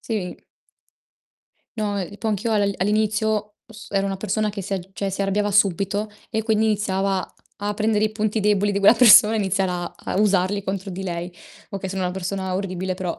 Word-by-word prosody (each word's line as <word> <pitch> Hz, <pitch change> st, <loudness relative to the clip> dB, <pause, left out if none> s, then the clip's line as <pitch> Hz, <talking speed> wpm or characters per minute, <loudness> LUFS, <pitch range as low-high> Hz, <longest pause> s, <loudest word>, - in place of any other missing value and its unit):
Sì. 205 Hz, -6 st, -4 dB, 1.4 s
No, 205 Hz, -1 st, -1 dB
e 195 Hz, +2 st, -6 dB
po' 220 Hz, -, -3 dB
anch'io 215 Hz, +2 st, -1 dB
al 205 Hz, -2 st, +2 dB
all'inizio 210 Hz, +1 st, 0 dB
s 215 Hz, -2 st, -12 dB
ero 195 Hz, 0 st, +1 dB
una 195 Hz, -1 st, -2 dB
persona 215 Hz, +2 st, -1 dB
che 205 Hz, -1 st, -5 dB
si 195 Hz, -, -6 dB
al 195 Hz, -, -1 dB
cioè, 195 Hz, -1 st, -2 dB
si 195 Hz, -, -5 dB
arrabbiava 205 Hz, +1 st, 0 dB
subito 200 Hz, +1 st, +1 dB, 0.2 s
e 220 Hz, -1 st, -1 dB
quindi 220 Hz, 0 st, +1 dB
iniziava 195 Hz, -3 st, -1 dB, 0.2 s
a 205 Hz, 0 st, -2 dB
prendere 215 Hz, 0 st, +1 dB
i 215 Hz, -, 0 dB
punti 215 Hz, 0 st, -1 dB
deboli 205 Hz, 0 st, +2 dB
di 200 Hz, -, 0 dB
quella 200 Hz, +3 st, +6 dB
persona 225 Hz, -2 st, +8 dB
iniziar 195 Hz, -2 st, 0 dB
a 175 Hz, -1 st, -4 dB
a -, -, -4 dB
usarli 200 Hz, -1 st, +2 dB
contro 195 Hz, 0 st, -4 dB
di 185 Hz, +1 st, -6 dB
lei. 175 Hz, -1 st, -4 dB, 0.4 s
Okay, 195 Hz, -1 st, -5 dB
sono 190 Hz, 0 st, -3 dB
una 180 Hz, -, -1 dB
persona 190 Hz, 0 st, -3 dB
orribile 185 Hz, -1 st, -3 dB
però 180 Hz, -2 st, -4 dB
200 Hz, 190 wpm, -22 LUFS, 190-210 Hz, 1.4 s, persona